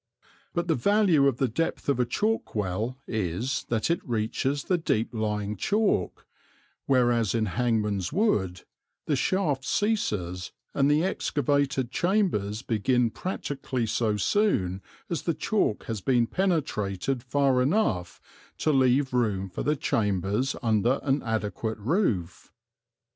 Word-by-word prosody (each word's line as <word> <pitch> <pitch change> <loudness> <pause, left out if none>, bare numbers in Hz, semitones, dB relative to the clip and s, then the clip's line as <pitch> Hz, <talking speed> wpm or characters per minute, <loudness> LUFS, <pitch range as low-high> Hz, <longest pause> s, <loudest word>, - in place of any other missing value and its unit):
But 170 0 0
the 165 - +3
value 175 - +3
of 135 -4 +1
the 135 - +2
depth 165 +9 -2
of 140 -3 +1
a 125 - +2
chalk 220 - -1
well 105 +5 -2
is 110 +5 -2
that 115 +6 +1
it 170 - 0
reaches 125 +5 -1
the 180 -2 +1
deep 115 -9 0
lying 105 -2 -2
chalk, 205 - 0 0.6
whereas 120 -5 +3
in 110 -1 +1
Hangman's 105 -4 0
Wood 100 - 0 0.4
the 150 - +1
shaft 145 -1 0
ceases 105 - -1 0.2
and 140 0 +3
the 150 +2 +3
excavated 140 -6 0
chambers 165 - 0
begin 120 +1 +1
practically 135 - -3
so 110 -1 0
soon 100 - +1 0.3
as 170 - -2
the 170 - -1
chalk 160 - 0
has 110 -3 -4
been 120 +1 +3
penetrated 135 - -1
far 135 -1 +2
enough 125 - 0 0.4
to 155 - +1
leave 130 0 +3
room 105 -6 0
for - - -4
the 150 - +1
chambers 105 - 0
under 115 +3 +2
an 140 0 +1
adequate 110 -1 -2
roof. 105 - -1
125 Hz, 130 wpm, -27 LUFS, 105-150 Hz, 0.6 s, the